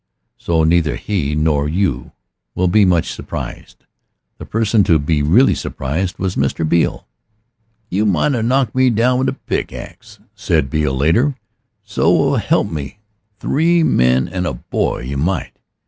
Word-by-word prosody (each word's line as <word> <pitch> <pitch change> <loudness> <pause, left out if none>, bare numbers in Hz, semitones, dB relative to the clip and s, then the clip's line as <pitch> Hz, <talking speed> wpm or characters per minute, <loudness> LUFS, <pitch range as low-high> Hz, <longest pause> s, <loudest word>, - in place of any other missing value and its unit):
So 80 -2 +1
neither 80 -1 +2
he 75 -8 -2
nor 75 -1 +1
you 85 -7 -1 0.4
will 90 - +1
be 100 +3 +4
much 90 -3 +1
surprised. - - -8 0.5
The - - -9
person 110 -1 +2
to 85 -3 +4
be 75 +1 0
really 95 - +4
surprised 80 +8 -3
was 95 -1 -2
Mr. 70 +4 -1
Beale. 85 +1 0 0.9
"You 105 +4 +1
might 100 - +1
a 120 - -1
knocked 130 +3 +1
me 130 0 +3
down 125 +3 +2
with 130 0 +1
a - - -3
pickaxe," - - -6 0.2
said 65 - -1
Beale 75 -4 0
later, 115 - +2 0.5
"so 105 -3 +2
help - - +1
me 75 +3 -6 0.4
three 165 +7 +2
men 65 - +2
and 90 +1 -3
a 75 - -2
boy - - -2
you 65 +3 -5
might. 90 +7 -1
85 Hz, 150 wpm, -18 LUFS, 75-110 Hz, 0.9 s, be